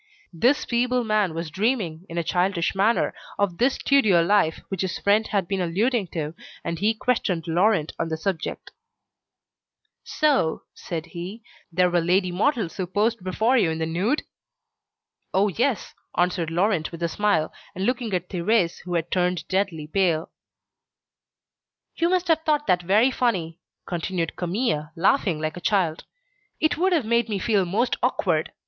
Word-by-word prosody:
This 250 - +2
feeble 245 +1 +1
man 210 -6 +1
was 165 -1 -4
dreaming, 190 - -1
in 165 - -6
a 170 - +1
childish 180 +1 0
manner, 205 +4 +2 0.2
of 195 -4 0
this 260 +3 +3
studio 215 -12 +4
life 170 -3 +2
which 195 -2 -3
his 190 -2 -2
friend 210 +2 +2
had 195 -4 0
been 195 0 -1
alluding 200 +5 0
to, 160 -2 -4 0.3
and 170 -1 -3
he 220 +4 +2
questioned 195 -8 -1
Laurent 175 -1 +2
on 165 - -1
the 160 - -2
subject. 170 0 -4 1.3
"So," 285 - +1
said 165 -2 -5
he, 185 +6 -7 0.3
"there 180 +1 +2
were 175 -1 +3
lady 180 +2 +2
models 210 - 0
who 185 -2 -2
posed 210 +2 0
before 220 +7 +2
you 175 - +2
in 160 - -2
the 160 - -1
nude?" 185 - 0 1.1
"Oh! 200 +2 +4
yes," 235 +5 -1 0.2
answered 175 -2 +1
Laurent 175 -1 +1
with 170 0 -7
a - - +2
smile, 200 -3 0 0.2
and 190 +2 -2
looking 245 -2 -1
at 180 0 -2
Thérèse, 180 0 +1
who 175 -1 -3
had 170 0 -2
turned 180 -2 0
deadly 185 -5 -1
pale. 165 -1 0 1.6
"You 335 0 +1
must 365 0 +1
have 325 -1 +3
thought 300 -2 +1
that 180 -1 +2
very 210 +9 +3
funny," 180 -11 -1 0.3
continued 175 -1 -3
Camille, 175 -4 -1
laughing 180 - +2
like 155 +1 -3
a - - -7
child. 180 -7 0 0.5
"It 315 - +2
would 370 +5 +1
have 320 -9 +2
made 235 0 +1
me 205 - -1
feel 195 -1 +1
most 225 +8 0
awkward. 175 -10 0
190 Hz, 165 wpm, -24 LUFS, 170-225 Hz, 1.6 s, studio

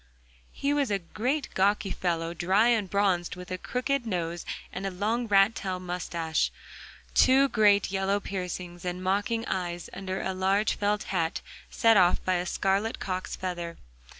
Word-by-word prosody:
He 280 +1 -1
was 285 -4 +1
a 200 - +1
great 250 - -2
gawky 195 0 +2
fellow, 170 -2 -1
dry 190 +7 +3
and 220 -5 +2
bronzed, 190 -4 +1
with 180 0 -10
a 185 - -3
crooked 255 +2 -1
nose, 175 -4 -3 0.3
a 185 - -4
long 215 +6 -1
rat 200 +1 +5
tail 185 -3 -3
moustache, 170 -3 -1 0.6
two 270 +2 +5
great 205 -4 +4
yellow 195 +1 +1
piercing 180 -2 -5
and 180 0 -4
mocking 205 +4 0
eyes, 175 -2 -3
under 190 0 -4
a 190 - -2
large 195 +3 +2
felt 205 0 0
hat 165 -3 0 0.3
set 225 -3 +4
off 180 -1 +4
by 185 - +2
a 175 +1 -2
scarlet 195 +5 0
cock's 185 -1 -4
feather. 175 -2 -4
190 Hz, 155 wpm, -28 LUFS, 180-210 Hz, 0.6 s, rat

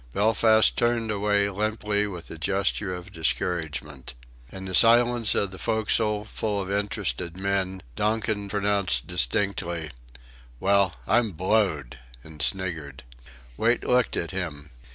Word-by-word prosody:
Belfast 110 +1 +4
turned 120 -2 +1
away 100 0 +1
limply 105 0 -1
with 90 -4 -8
a - - -7
gesture 95 +2 0
of 90 +2 -10
discouragement. 80 -6 -3 0.4
In 95 0 -8
the 95 - -6
silence 120 +1 +5
of 100 -2 0
the 95 - -10
forecastle, 110 -1 0
full 105 -2 -2
of 95 0 -4
interested 90 -5 -2
men, 95 -1 -1
Donkin 105 -1 -1
pronounced 100 -1 +1
distinctly: 85 0 0 0.7
"Well, 100 -3 +2
I'm 115 - +2
blowed!" 80 - 0 0.2
and 80 -2 -11
sniggered. 70 -2 -2 0.5
Wait 115 +2 +1
looked 125 0 +1
at 85 - -3
him. 80 -6 -5
100 Hz, 125 wpm, -25 LUFS, 85-105 Hz, 0.7 s, silence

